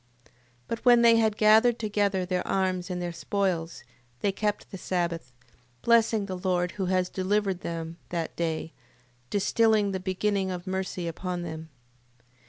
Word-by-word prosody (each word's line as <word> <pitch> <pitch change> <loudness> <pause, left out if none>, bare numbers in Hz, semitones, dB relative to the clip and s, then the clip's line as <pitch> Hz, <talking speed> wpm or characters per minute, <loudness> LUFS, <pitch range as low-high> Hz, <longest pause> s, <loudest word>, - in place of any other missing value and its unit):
8:27. - - -26 0.4
But 230 - -3
when 240 -1 +6
they 230 -1 +7
had 220 -2 +2
gathered 220 +3 +5
together 205 -4 0
their 180 0 -2
arms 185 -1 0
and 180 -1 -3
their 175 -1 -3
spoils, 175 -2 -2 0.4
they 200 - +2
kept 210 +1 -2
the 195 - -6
sabbath: 170 -7 -2 0.5
blessing 225 -2 +3
the 185 -2 -5
Lord 180 -1 0
who 190 -3 -3
had 185 -1 +1
delivered 195 0 0
them 165 0 -5
that 170 -2 -3
day, 165 -1 -2 0.6
distilling 210 0 +2
the 190 - -2
beginning 190 +1 -1
of 180 -1 -5
mercy 185 -2 -3
upon 175 +1 -4
them. 160 -1 -7
190 Hz, 155 wpm, -27 LUFS, 175-210 Hz, 0.6 s, they